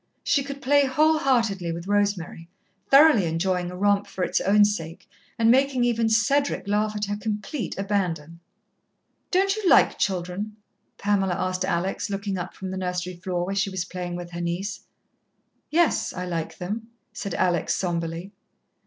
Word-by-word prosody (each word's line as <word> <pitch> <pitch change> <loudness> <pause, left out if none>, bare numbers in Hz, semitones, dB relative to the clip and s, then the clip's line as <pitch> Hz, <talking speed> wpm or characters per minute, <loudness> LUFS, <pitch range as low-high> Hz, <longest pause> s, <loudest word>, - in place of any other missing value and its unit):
She 280 - +2
could 280 0 -8
play 285 +1 +4
whole 310 +4 +3
heartedly 225 - +1
with 170 +1 -5
Rosemary, 200 -5 -1 0.4
thoroughly 275 - +6
enjoying 180 +2 -1
a 180 - -7
romp 205 +1 +2
for 185 - -4
its - - 0
own 205 +2 +5
sake, 165 -5 -4 0.3
and 230 0 +4
making 265 0 +3
even 230 -2 +2
Cedric 250 +4 +1
laugh 210 +1 0
at 210 0 -1
her 205 +1 -2
complete 210 +5 -4
abandon. 175 -5 -2 0.9
"Don't 390 +2 +2
you 425 -4 0
like - - +5
children?" 190 +3 -2 0.4
Pamela 195 -3 +1
asked 185 +1 -1
Alex, 190 +2 -1
looking 200 0 -3
up 180 +1 -6
from 190 -1 -6
the 190 - -4
nursery 180 0 -3
floor 175 0 -3
where 195 - -3
she 195 0 0
was 190 -2 -3
playing 180 -1 -5
with 175 0 -7
her 170 0 -5
niece. 180 +4 -3 0.9
"Yes, 335 0 +2
I 180 0 -4
like 165 -2 -4
them," 210 +5 -5 0.3
said 200 -4 -4
Alex 175 -2 +1
sombrely. 170 +1 -3
195 Hz, 160 wpm, -25 LUFS, 180-225 Hz, 0.9 s, thoroughly